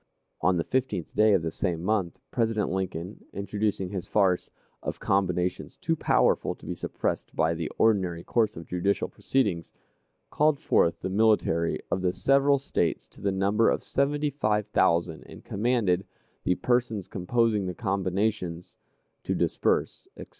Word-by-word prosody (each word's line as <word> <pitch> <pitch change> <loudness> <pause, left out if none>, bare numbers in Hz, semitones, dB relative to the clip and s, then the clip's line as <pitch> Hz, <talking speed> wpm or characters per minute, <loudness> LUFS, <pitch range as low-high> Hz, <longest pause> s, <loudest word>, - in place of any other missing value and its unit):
On 90 -1 +3
the 85 - 0
15th 130 -9 -2
day 110 0 +4
of 95 -4 +2
the 80 - -2
same 85 -3 -2
month, 95 -4 0
President 115 -4 0
Lincoln, 95 0 -4
introducing 100 -1 -2
his 95 -1 -4
farce 95 -4 +2 0.3
"of - - -4
combinations 95 +3 0
too 165 +3 0
powerful - - +2
to - - -16
be - - -3
suppressed - - -3
by 80 - +2
the 80 -1 -3
ordinary 95 -6 +2
course 110 -2 +1
of 80 - -7
judicial 90 +4 0
proceedings," 100 -11 -1 0.6
called 150 -1 +2
forth 85 - +2
the 95 - -3
military 100 -5 +2
of 95 - 0
the 90 -1 +1
several 140 +4 +3
States 90 -11 -1
to - - -17
the 100 - +1
number 100 +4 +2
of - - 0
seventy 145 +2 0
five 105 -6 0
thousand, 85 -4 +2
and - - -13
commanded 100 -4 +1 0.4
"the 90 - +3
persons 120 -5 0
composing 105 +1 0
the 90 - -4
combinations" 95 -3 -2 0.5
to - - -2
disperse, - - 0
etc. - - -9
100 Hz, 155 wpm, -27 LUFS, 90-115 Hz, 0.6 s, day